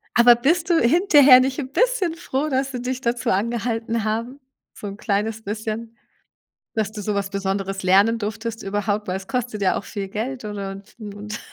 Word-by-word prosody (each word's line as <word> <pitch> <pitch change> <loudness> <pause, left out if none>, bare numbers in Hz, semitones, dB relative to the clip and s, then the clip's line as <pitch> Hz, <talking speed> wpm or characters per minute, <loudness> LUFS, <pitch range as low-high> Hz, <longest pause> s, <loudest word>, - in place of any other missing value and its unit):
Aber 240 0 +8
bist 325 +8 +1
du 335 - +5
hinterher 285 -2 +7
nicht 260 0 -1
'n 270 -2 -5
bisschen 445 -6 +1
froh, 300 -2 -2
dass 270 0 0
sie 250 -1 -4
dich 255 0 -3
dazu 240 -1 -1
angehalten 225 +2 -1
haben? 230 +6 -3 0.3
So - - -8
'n 200 0 -6
kleines 215 +2 -1
bisschen, 220 +2 -5 0.8
dass 215 -2 -1
du 215 -1 -7
so 210 +1 -2
was 200 -1 -1
Besonderes 195 0 -3
lernen 200 +5 +4
durftest 220 +1 -4
überhaupt, 205 +1 -2
weil 185 - -1
es 190 - -11
kostet 245 -4 -3
ja 190 - +2
auch - - -5
viel 200 -2 -5
Geld 240 +4 -4
ansonsten 200 +1 -7
und 210 +2 -7
225 Hz, 180 wpm, -22 LUFS, 205-255 Hz, 0.8 s, Aber